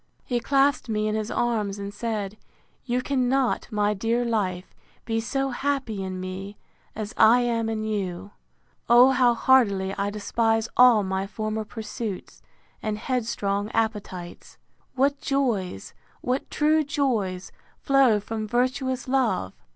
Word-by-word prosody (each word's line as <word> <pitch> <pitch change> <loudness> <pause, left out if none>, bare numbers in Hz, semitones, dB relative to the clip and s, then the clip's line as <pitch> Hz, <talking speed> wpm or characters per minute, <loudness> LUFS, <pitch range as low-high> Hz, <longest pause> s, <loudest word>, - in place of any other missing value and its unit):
He 245 -2 0
clasped 275 0 +2
me 215 -1 0
in 215 - -1
his 215 0 -2
arms, 215 -4 -1
and 200 0 -6
said, 210 -2 -3 0.5
You 250 0 -1
cannot, 260 -1 +1
my 210 -1 +1
dear 230 +4 0
life, 190 -6 -2 0.3
be 225 -1 -1
so 270 +4 -1
happy 265 -6 -2
in 185 -1 -5
me, 190 +2 -6 0.4
as 215 +1 -5
I 230 +3 +6
am 230 -2 0
in 220 -1 -2
you. 200 -3 -3 0.6
O 245 +2 +7
how 250 -2 +3
heartily 200 -7 +3
I 200 0 0
despise 225 +2 0
all 245 -4 +6
my 190 0 -2
former 215 +1 -3
pursuits, 215 -2 -6 0.4
and 215 -1 -2
headstrong 210 -4 -2
appetites! 210 -6 -3 0.4
What 275 +2 +1
joys, 225 - -1 0.3
what 255 +2 -2
true 310 +1 +2
joys, 230 -11 -1 0.3
flow 270 -6 +3
from 215 +1 -5
virtuous 255 +2 -1
love! 240 - 0
225 Hz, 135 wpm, -25 LUFS, 205-250 Hz, 0.6 s, O